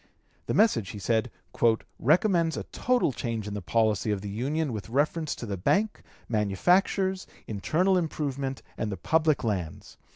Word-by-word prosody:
The - - 0
message, 125 - +3
he - - -7
said, 110 +5 0 0.7
"recommends 165 - +3
a - - -3
total 250 - +1
change 115 -2 -3
in 105 - -4
the 105 - -4
policy 110 +2 +1
of 105 -2 0
the 100 - -5
Union 140 +6 -1
with 110 0 -6
reference 150 +4 0
to - - -7
the 100 -3 -3
Bank, 205 - +1 0.3
manufactures, 180 - +1 0.2
internal 175 - +1
improvement, 140 -5 -3 0.2
and 110 - -1
the 95 - -4
public 155 - +2
lands. 95 -8 -3
130 Hz, 155 wpm, -27 LUFS, 105-165 Hz, 0.7 s, message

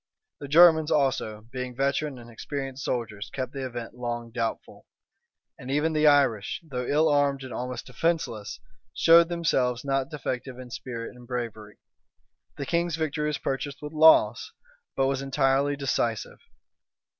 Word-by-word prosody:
The 140 - -7
Germans 160 +1 +6
also, 130 -7 0
being 125 -1 -5
veteran 140 +1 -1
and 120 -1 -12
experienced 135 +3 -6
soldiers, 110 -4 -3
kept 130 -1 -4
the 135 -1 -5
event 120 -3 -6
long 120 -1 -5
doubtful; 115 -1 -4 0.7
and 125 - -9
even 150 +3 +1
the 155 0 +3
Irish, 135 -8 +3
though 125 -4 -4
ill 155 +2 +3
armed 145 -2 +2
and 130 - -8
almost 125 0 -5
defenceless, 125 -8 -2 0.4
showed 170 0 +6
themselves 130 -8 0
not 135 -1 0
defective 130 -3 -5
in 125 -1 -10
spirit 120 -1 -6
and 125 -1 -14
bravery. 115 -4 -5 0.8
The 140 - -4
king's 170 +1 0
victory 150 -2 -2
was 150 -2 -1
purchased 140 +1 -4
with 150 +1 -6
loss, 160 +1 +5 0.4
but 135 - +2
was 135 0 0
entirely 135 +1 +1
decisive. 120 -5 -2
135 Hz, 145 wpm, -26 LUFS, 125-150 Hz, 0.8 s, Germans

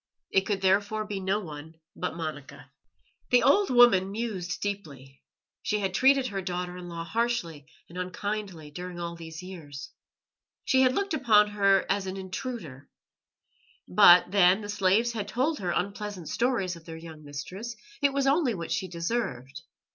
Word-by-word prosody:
It 190 - +2
could 200 -2 -1
therefore 205 +3 +2
be 205 -2 -4
no 190 +2 0
one 160 -3 -9 0.2
but 180 - -3
Monica. 150 -4 -7 0.6
The 250 - +5
old 395 +8 +4
woman 240 -7 +6
mused 195 -5 -4
deeply. 140 -10 -6 0.4
She 210 - 0
had 195 -3 -2
treated 270 +5 +4
her 200 -5 -3
daughter 180 -1 -4
in 180 -1 -8
law 170 -1 -5
harshly 170 - -2 0.2
and 180 +2 -8
unkindly 185 -4 -4
during 180 +2 -7
all 170 0 -4
these 165 +1 -9
years. 150 -7 -9 0.7
She 260 - +4
had 255 -1 +4
looked 395 -3 -1
upon 220 -8 +4
her 195 -2 +3
as 195 -1 0
an 190 +1 -4
intruder. 185 - -6 1.0
But 175 - +7
then, 195 0 +5
the 205 - -7
slaves 205 +3 +2
had 210 -3 -4
told 265 +8 0
her 180 - -3
unpleasant 200 -1 -3
stories 230 -8 0
of 165 -1 -14
their 165 -1 -8
young 160 -2 -11
mistress; 180 +11 -7 0.3
it 285 -1 +4
was 275 0 0
only 275 -4 +2
what 170 -2 -6
she 190 - -1
deserved. 170 - -3
190 Hz, 160 wpm, -28 LUFS, 170-215 Hz, 1.0 s, But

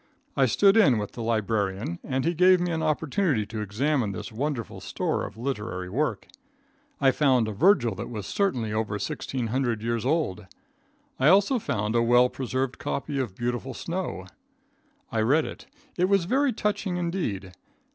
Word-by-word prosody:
I 135 - +4
stood 195 - +4
in 155 - +5
with 105 -1 -3
the 120 - -7
librarian 105 -5 -1
and 130 +1 -2
he 170 - +2
gave 180 +2 +5
me 175 0 -1
an 160 -1 -1
opportunity 155 - 0
to 110 +1 -5
examine 110 +2 0
this 95 - -6
wonderful 130 0 -3
store - - -2
of - - -13
literary 105 -7 -4
work. 150 +8 -1 0.7
I 135 -2 +5
found 130 -6 +3
a - - -2
Virgil 120 - +3
that 105 +5 -6
was 105 -4 -5
certainly 125 - -1
over 110 -1 -1
1,600 115 +2 -2
years 115 -1 -1
old. 125 - -1 0.7
I 130 - +4
also 200 - +5
found 105 - -2
a 120 - +3
well 120 +2 +5
preserved 130 0 -3
copy 140 +1 -3
of 120 -8 -3
"Beautiful 120 +2 -3
Snow." 170 - -4 0.9
I 110 - +1
read 145 +8 +3
it. - - -9 0.3
It 180 - +3
was 195 -3 +3
very 270 +7 +2
touching 205 -4 -1
indeed. 165 - -3
125 Hz, 165 wpm, -26 LUFS, 110-165 Hz, 0.9 s, in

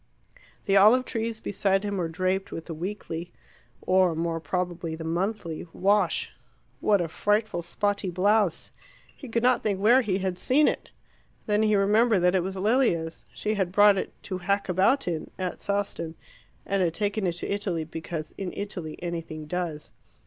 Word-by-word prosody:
The 195 - +2
olive 220 +6 +6
trees 225 -1 -3
beside 195 -1 0
him 205 -1 -2
were 175 -3 0
draped 185 +3 -1
with 165 - -6
the 165 - -6
weekly 175 -1 -5 0.5
or 185 -2 +3
more 165 0 -1
probably 170 0 -3
the 160 - -7
monthly 170 0 -2
wash. 200 -2 +1 0.5
What 205 +2 +3
a 170 - -1
frightful 205 +2 0
spotty 200 +3 -1
blouse! 200 +1 +1 0.4
He 270 - -10
could 230 +1 0
not 250 -1 +4
think 200 -3 -1
where 235 +6 +5
he 200 -6 0
had 185 -2 -2
seen 285 +9 +3
it. - - -2 0.6
Then 210 0 +2
he 215 -1 +3
remembered 210 +1 +3
that 180 +1 +4
it 190 - +3
was 190 +2 -4
Lilia's. 190 -6 +1
She 215 - -2
had 190 -4 -1
brought 205 +1 +6
it - - -4
"to 185 -2 -4
hack 200 +2 0
about 195 +9 +3
in" 165 -3 -3
at 185 -1 -3
Sawston, 200 -5 -2 0.5
and 195 -1 0
had 170 -2 +1
taken 205 0 -1
it 175 - 0
to 175 +3 -4
Italy 190 -5 -1
because 160 0 -6
"in 190 -2 -3
Italy 180 -6 -5
anything 165 -3 -5
does." 165 -2 -4
190 Hz, 170 wpm, -26 LUFS, 170-210 Hz, 0.6 s, olive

